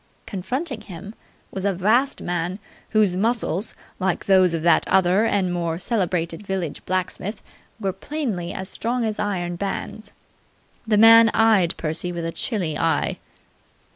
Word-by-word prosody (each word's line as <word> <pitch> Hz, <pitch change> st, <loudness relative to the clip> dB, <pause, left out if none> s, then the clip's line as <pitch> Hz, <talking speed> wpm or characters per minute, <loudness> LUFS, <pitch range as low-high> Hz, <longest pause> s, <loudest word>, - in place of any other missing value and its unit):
Confronting 245 Hz, -, -4 dB
him 195 Hz, +2 st, -9 dB, 0.4 s
was 190 Hz, -, -5 dB
a 200 Hz, -2 st, +1 dB
vast 230 Hz, +9 st, +2 dB
man 175 Hz, +1 st, -2 dB, 0.3 s
whose 210 Hz, -4 st, +3 dB
muscles, 215 Hz, -1 st, 0 dB, 0.2 s
like 185 Hz, -2 st, -1 dB
those 190 Hz, -2 st, +5 dB
of 165 Hz, -1 st, -2 dB
that 170 Hz, -1 st, +4 dB
other 190 Hz, +3 st, +3 dB
and 190 Hz, -5 st, +1 dB
more 170 Hz, -2 st, -1 dB
celebrated 180 Hz, -4 st, -1 dB
village 190 Hz, -6 st, -4 dB
blacksmith, 185 Hz, +3 st, -2 dB, 0.4 s
were 195 Hz, -3 st, -1 dB
plainly 205 Hz, -, -4 dB
as 190 Hz, -, -5 dB
strong 235 Hz, +3 st, -2 dB
as 215 Hz, -1 st, -3 dB
iron 175 Hz, -4 st, -2 dB
bands. 200 Hz, +2 st, -5 dB, 0.8 s
This 215 Hz, -2 st, +3 dB
man 225 Hz, +1 st, +8 dB
eyed 210 Hz, -6 st, +3 dB
Percy 165 Hz, +2 st, -3 dB
with 170 Hz, -1 st, -4 dB
a 165 Hz, -, -2 dB
chilly 175 Hz, -7 st, -2 dB
eye. 165 Hz, -1 st, 0 dB
190 Hz, 140 wpm, -23 LUFS, 175-220 Hz, 0.8 s, man